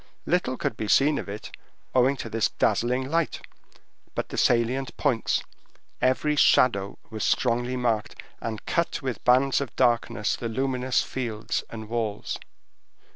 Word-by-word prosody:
Little 165 -8 +1
could - - -2
be 110 - -4
seen 145 +6 +4
of - - -6
it, 105 +2 -7 0.4
owing 130 +2 +4
to - - -5
this 115 -1 +1
dazzling 125 +2 +1
light, 165 -1 0 0.8
but - - -2
the - - -6
salient 120 +3 +1
points; 130 -6 +1 0.6
every 140 +4 +2
shadow 100 -8 +4
was 110 -1 -4
strongly 120 +1 +1
marked, 115 -4 0 0.3
and 110 -2 -5
cut 170 -4 -1
with 130 -3 -3
bands 130 +3 +4
of 140 - -5
darkness 120 -3 +1
the 115 - -4
luminous 130 0 0
fields 115 -3 -3
and 110 -1 -7
walls. 110 -2 -3
125 Hz, 140 wpm, -26 LUFS, 115-130 Hz, 0.8 s, seen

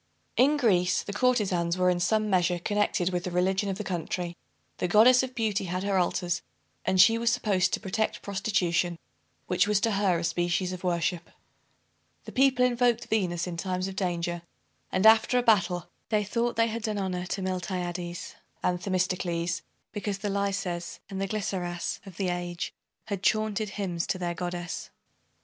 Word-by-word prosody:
In 285 +4 +4
Greece, 180 -9 +2
the 200 - -6
courtezans 200 -8 +1
were 180 0 +4
in 175 - 0
some 215 +4 +2
measure 180 -3 +2
connected 185 -1 0
with 175 -1 -1
the 180 - -3
religion 190 +3 +1
of 190 - -2
the 210 - -4
country. 175 -1 -3 0.4
The - - +1
Goddess 230 +7 +6
of 260 -1 -5
Beauty 215 -4 0
had 180 +1 -3
her 200 -1 +2
altars; 175 0 0 0.4
and 185 - +1
she 225 +4 +7
was 235 0 +2
supposed 210 -6 +1
to - - 0
protect 215 +2 -2
prostitution, 185 -4 0 0.5
which 185 +2 +2
was 210 -1 +3
to 225 - +2
her 195 -3 +2
a 165 - -3
species 175 +2 0
of 185 - -7
worship. 175 -1 -1 1.0
The - - -8
people 260 -2 +4
invoked 240 -1 +1
Venus 180 -5 0
in 175 -2 -5
times 185 +1 -2
of 195 - -6
danger; 175 -2 -2 0.5
and, 185 +3 +1
after 220 +3 +6
a 245 - +2
battle, 195 -6 +2 0.2
they 215 -1 +2
thought 235 +4 -1
they 230 - +4
had 230 +1 -4
done 215 -1 -2
honor 185 -2 -2
to 195 +1 -3
Miltiades 180 -1 -3 0.3
and 180 -1 0
Themistocles, 180 -3 -1 0.3
because 205 -1 -3
the 205 0 -3
Laises 195 -3 -2
and 195 0 -3
the 195 - 0
Glyceras 185 -4 -3
of 185 -2 -11
the 190 -2 0
age 175 -1 -3 0.3
had 200 -3 -4
chaunted 215 0 +1
hymns 175 -5 -2
to - - 0
their 175 -1 -2
Goddess. 175 0 -4
185 Hz, 175 wpm, -28 LUFS, 175-210 Hz, 1.0 s, she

